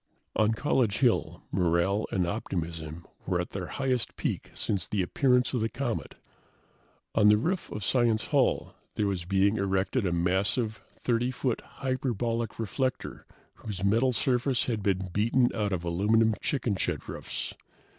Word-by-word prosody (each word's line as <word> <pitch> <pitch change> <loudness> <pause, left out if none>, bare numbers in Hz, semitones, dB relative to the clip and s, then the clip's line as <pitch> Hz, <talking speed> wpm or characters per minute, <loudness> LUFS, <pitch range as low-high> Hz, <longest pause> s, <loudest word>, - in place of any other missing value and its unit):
On 110 +1 +3
College 115 -4 +1
Hill, 125 -4 +1
morale 90 +3 +2
and 90 -2 +1
optimism 85 -4 -4 0.2
were 90 -1 +1
at 90 - -3
their 95 -3 -4
highest 130 -4 -1
peak - - -3
since 100 -3 -1
the 100 -3 0
appearance 125 +7 +2
of 125 - 0
the 110 - +1
comet. 120 -1 -3 1.0
On 105 -1 +5
the 105 - +6
roof 170 - -1
of 105 -2 -4
Science 115 -4 +2
Hall - - +2 0.2
there 105 - +1
was 95 -4 -1
being 100 +3 +2
erected 100 +3 0
a - - 0
massive, 95 +5 +1 0.2
30 120 0 +1
foot, 125 -2 -1 0.2
hyperbolic 120 -3 -1
reflector 130 +4 -3 0.3
whose 100 -4 -6
metal 115 +6 +3
surface 125 +1 +1
had 115 -4 -1
been 95 -1 0
beaten 115 +5 +3
out 105 -2 -1
of 90 -3 -1
aluminum 105 +6 +3
chicken 120 -7 0
shed - - -2
roofs. - - -5
110 Hz, 150 wpm, -28 LUFS, 95-120 Hz, 1.0 s, the